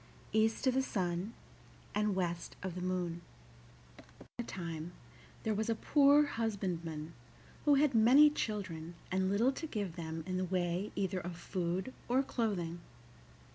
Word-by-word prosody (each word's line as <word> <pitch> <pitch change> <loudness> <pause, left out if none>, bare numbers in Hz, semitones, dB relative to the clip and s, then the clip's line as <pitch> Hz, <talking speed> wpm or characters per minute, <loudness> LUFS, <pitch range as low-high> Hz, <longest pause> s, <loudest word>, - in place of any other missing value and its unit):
EAST 220 +3 +2
OF 260 - +4
THE 265 - +3
SUN 185 -3 -2 0.6
AND 210 -1 +1
WEST 175 -2 -2
OF 190 -2 -3
THE 180 - -5
MOON 180 -2 -2 0.8
Once - - -18
upon - - -22
a - - 0
time 170 -4 -5 0.5
there 220 - +1
was 220 +2 -1
a 225 - +2
poor 285 +5 +5
husbandman 175 - -3 0.5
who 290 -1 +6
had 285 -1 +4
many 255 +7 +7
children 180 - -3 0.2
and 190 0 +1
little 225 +7 +3
to 320 +4 -5
give 205 - -3
them 160 -1 -4
in 185 0 -2
the 185 - 0
way 180 +1 -1
either 190 -1 0
of 175 0 -5
food 185 +6 -2 0.2
or 260 +3 +3
clothing. 185 -10 -1
190 Hz, 155 wpm, -34 LUFS, 175-225 Hz, 0.8 s, many